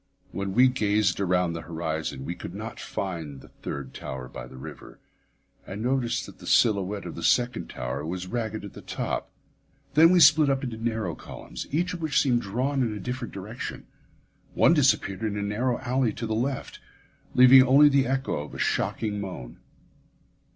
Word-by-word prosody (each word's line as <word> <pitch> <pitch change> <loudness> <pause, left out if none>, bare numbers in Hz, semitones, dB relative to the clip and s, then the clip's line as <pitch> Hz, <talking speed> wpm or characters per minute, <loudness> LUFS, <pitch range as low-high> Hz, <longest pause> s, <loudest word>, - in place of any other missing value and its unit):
When 100 -1 -3
we 125 +2 +7
gazed 105 -6 +1
around 90 -3 +1
the 80 - -5
horizon, 80 -4 -4
we 85 - -3
could 90 +1 -8
not 110 +2 -7
find 80 -8 -5
the - - -15
third 70 -2 -7
tower 65 -1 -6
by - - -9
the 65 +1 -12
river, 65 - -10 0.7
and 100 +3 -5
noticed 125 -1 0
that - - -13
the - - -11
silhouette 100 -3 +2
of 85 - -6
the 85 - -7
second 125 +7 +1
tower 65 +3 -4
was 90 +3 -4
ragged 110 0 -3
at 100 - -10
the - - -10
top. - - -3 0.6
Then 160 +2 +7
we 180 0 +5
split 150 -1 +7
up 135 0 0
into 120 -3 -3
narrow 110 -6 -2
columns, - - -8
each 175 +5 0
of 175 - -6
which 155 -3 +2
seemed 125 -4 +2
drawn 130 +7 -1
in 115 -4 0
a - - -6
different 125 +3 -5
direction. 105 +5 -6 0.7
One - - +5
disappeared 95 +2 +2
in 105 -2 -2
a 100 - -2
narrow 120 +5 0
alley 130 -3 0
to 115 - -5
the 110 - -2
left, 130 +4 -3 0.6
leaving 130 +1 +9
only 135 +3 +7
the 140 -3 +3
echo 135 +1 -1
of 75 - -11
a - - -6
shocking 105 -2 -1
moan. 90 -12 -7
110 Hz, 185 wpm, -26 LUFS, 90-130 Hz, 0.7 s, leaving